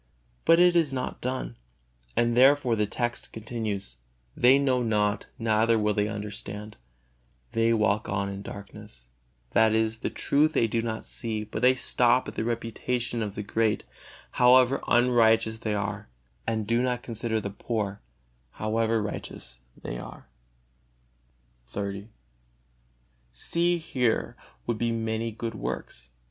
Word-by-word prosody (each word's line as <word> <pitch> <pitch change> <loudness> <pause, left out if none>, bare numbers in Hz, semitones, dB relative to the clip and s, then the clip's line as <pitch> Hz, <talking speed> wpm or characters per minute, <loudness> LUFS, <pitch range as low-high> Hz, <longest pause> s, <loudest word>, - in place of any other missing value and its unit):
But 165 +1 +6
it 175 0 +5
is 165 -5 +3
not 130 -1 -4
done, 130 +1 -3 0.6
and 120 0 +2
therefore 130 -1 +5
the 105 -1 0
text 120 +3 -3
continues: 110 - -4 0.4
"They 125 +3 +6
know 130 -3 +2
not, 105 -2 0
neither 115 0 +2
will 105 -1 +1
they 105 0 +1
understand; 105 0 -6 0.8
they 115 0 +2
walk 105 -2 +1
on 100 0 -1
in 100 0 -5
darkness"; 100 - -10 0.4
that 110 -1 +4
is, 110 0 0
the - - -2
truth 155 +2 +2
they - - +3
do 115 +1 0
not 110 -1 -4
see, 110 -2 -3
but 105 - -6
they 130 +1 +5
stop 125 0 +3
at - - -6
the - - -2
reputation 120 +1 -2
of 105 -2 -3
the 105 - -4
great, 110 +1 0 0.5
however 125 +2 +5
unrighteous 115 -2 +3
they 110 -2 -2
are; 100 -5 -4 0.4
and 110 -1 -1
do 115 +3 +1
not 125 -1 -1
consider 115 -1 -2
the 100 -1 -5
poor, 105 -1 -3 0.5
however 110 0 0
righteous - - -6 0.2
they - - -5
are. - - -10 1.4
XXX. 100 0 -4 1.2
See, 170 - 0
here 130 -8 -1 0.3
would 115 - -2
be 120 0 +1
many 115 0 -2
good 115 +1 -5
works. - - -6
110 Hz, 140 wpm, -27 LUFS, 105-120 Hz, 1.4 s, But